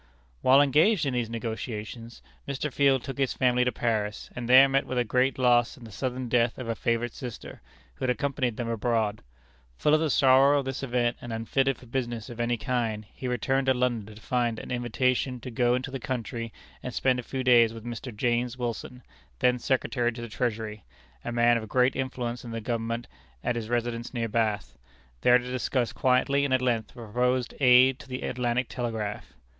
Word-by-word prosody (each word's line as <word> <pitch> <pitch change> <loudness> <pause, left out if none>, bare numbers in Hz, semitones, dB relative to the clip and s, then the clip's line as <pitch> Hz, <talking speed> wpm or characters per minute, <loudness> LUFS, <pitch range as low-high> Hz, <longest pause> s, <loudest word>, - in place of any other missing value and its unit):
While 135 +2 +6
engaged 160 - +3
in 135 - -1
these 120 -2 -1
negotiations, 115 0 -6 0.2
Mr. 140 0 -3
Field 135 -3 +3
took 135 0 -6
his 135 -2 +1
family 125 -1 +3
to 125 - +1
Paris, 110 -4 -2
and 120 -1 -5
there 130 +2 +9
met 135 0 +1
with 130 - -3
a 125 - +3
great 125 +3 +1
loss 120 +1 +3
in 125 - -14
the 115 - -11
sudden 130 +4 -3
death 120 0 +2
of 125 - -6
a 115 - 0
favorite 115 +1 -1
sister, 125 -4 -8 0.3
who - - -4
had - - 0
accompanied 130 -2 -1
them 120 - -3
abroad. 115 -2 0 0.6
Full 150 - +2
of 155 - +5
the 160 -1 0
sorrow 135 +1 +5
of 140 - -1
this 135 -1 -4
event, 120 -2 0
and 120 - -7
unfitted 130 +4 0
for - - -15
business 120 -3 -4
of 120 - -10
any 120 0 0
kind, 110 -2 -2
he 130 - -6
returned 130 +2 0
to 130 - +4
London 120 -4 -1
to - - -12
find 120 -3 0
an - - -8
invitation 125 +1 0
to 125 - -7
go 120 0 +2
into 130 +1 -4
the 135 - -4
country 115 -2 -4 0.3
and 125 - -6
spend 130 -1 +2
a - - -2
few 130 +2 -4
days 120 -3 +6
with 115 0 -10
Mr. 120 +2 -6
James 120 +2 -1
Wilson, 125 +1 -5 0.3
then 125 - +2
Secretary 125 -1 0
to 120 0 -8
the - - -5
Treasury, 110 -3 -3 0.4
a 120 - -4
man 120 0 +4
of 110 -2 -6
great 125 +2 +3
influence 125 -2 -3
in 120 - -8
the 115 0 -4
Government, 115 +1 -3 0.4
at 120 - 0
his 115 -2 -4
residence 120 +1 -2
near 115 -1 -1
Bath; 110 -2 -1 0.4
there 125 0 +6
to 125 0 -6
discuss 125 0 -1
quietly 130 +2 +2
and 135 -2 +2
at - - +2
length 115 -4 0
the - - -21
proposed 125 +2 -1
aid 125 0 +6
to - - -12
the 130 0 -5
Atlantic 125 +1 -1
Telegraph. 110 -4 -4
120 Hz, 205 wpm, -27 LUFS, 115-130 Hz, 0.6 s, there